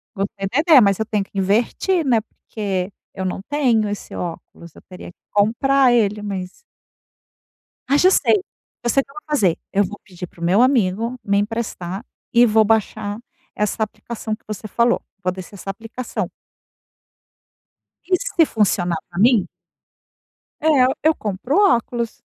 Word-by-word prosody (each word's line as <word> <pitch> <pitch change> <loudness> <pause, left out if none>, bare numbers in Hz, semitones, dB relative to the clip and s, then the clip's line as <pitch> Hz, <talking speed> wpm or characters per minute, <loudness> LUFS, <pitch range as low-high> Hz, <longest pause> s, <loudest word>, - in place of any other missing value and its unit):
Gostei 195 0 -3
da 260 - +2
ideia, 310 -4 +7
mas 200 -2 +3
eu 220 - 0
tenho 210 -2 -1
que 195 - -12
investir, 230 - +1
né? 240 -4 +3
Porque 200 -3 -4 0.2
eu 190 -1 -4
não 185 +1 -3
tenho 250 -7 +2
esse 205 - -6
óculos, 170 -1 -7
eu - - -14
teria 180 -1 -10
que - - -34
comprar 250 +6 +3
ele, 210 -3 +2
mas 195 -3 -4 1.4
Ah, 280 - +4
já 365 +5 +5
sei. - - +4 0.5
Eu 240 - 0
sei 275 - +3
o - - -11
que - - -19
eu - - -21
vou 305 - -7
fazer, 200 - +2
eu 200 - +3
vou 205 +3 -8
pedir 180 -2 -8
para 170 - -18
o - - -4
meu 185 +6 +4
amigo 230 -2 +2
me 200 -1 +1
emprestar 205 -2 -3 0.3
e 240 0 +7
vou 220 -1 +4
baixar 210 -1 0 0.4
essa 210 +1 -1
aplicação 215 +1 -5
que 215 - -33
você 215 0 -6
falou. 235 +3 +2 0.2
Vou 185 - +1
descer 185 +2 -9
essa 195 0 -8
aplicação. 225 +5 -5 1.8
E - - +7
se 425 -9 +2
funcionar 180 - +1
para 175 0 -6
mim 220 -4 +4 1.1
é, 315 - 0 0.4
eu 315 +1 +5
compro 210 +7 -3
óculos. 240 - +1
215 Hz, 165 wpm, -20 LUFS, 195-245 Hz, 1.8 s, ideia